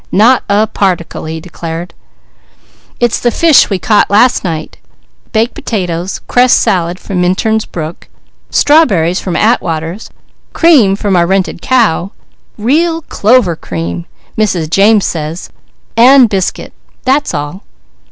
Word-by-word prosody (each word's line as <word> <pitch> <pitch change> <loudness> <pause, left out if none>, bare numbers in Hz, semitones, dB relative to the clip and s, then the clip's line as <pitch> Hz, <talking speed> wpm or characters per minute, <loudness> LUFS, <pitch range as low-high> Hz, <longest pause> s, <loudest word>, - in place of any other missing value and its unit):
"Not 235 +6 +4
a 205 +2 +3
particle," 185 -7 -2
he 160 +1 -5
declared. 170 0 -7 1.1
"It's 240 -1 +1
the 240 - +1
fish 315 +4 +4
we 195 - -1
caught 205 +5 +2
last 235 +5 +3
night, 160 -4 -5 0.5
baked 225 +2 0
potatoes, 180 -3 -4
cress 250 0 +3
salad 175 -1 0
from 185 -3 -3
Minturn's 215 +5 0
brook, 160 0 -7 0.4
strawberries 195 - +2
from 180 - -4
Atwaters, 170 -4 -1 0.4
cream 270 - +4
from 200 -1 -1
our 170 -1 +2
rented 190 -2 -1
cow, 210 -7 +1 0.5
real 325 +9 0
clover 215 - +2
cream, 85 - -6 0.3
Mrs. 180 -7 -1
James 205 +2 +3
says, 160 +1 -5 0.4
and 250 +2 +6
biscuit. 190 -3 -3 0.3
That's 275 - 0
all." 145 +6 -5
195 Hz, 125 wpm, -11 LUFS, 170-235 Hz, 1.1 s, and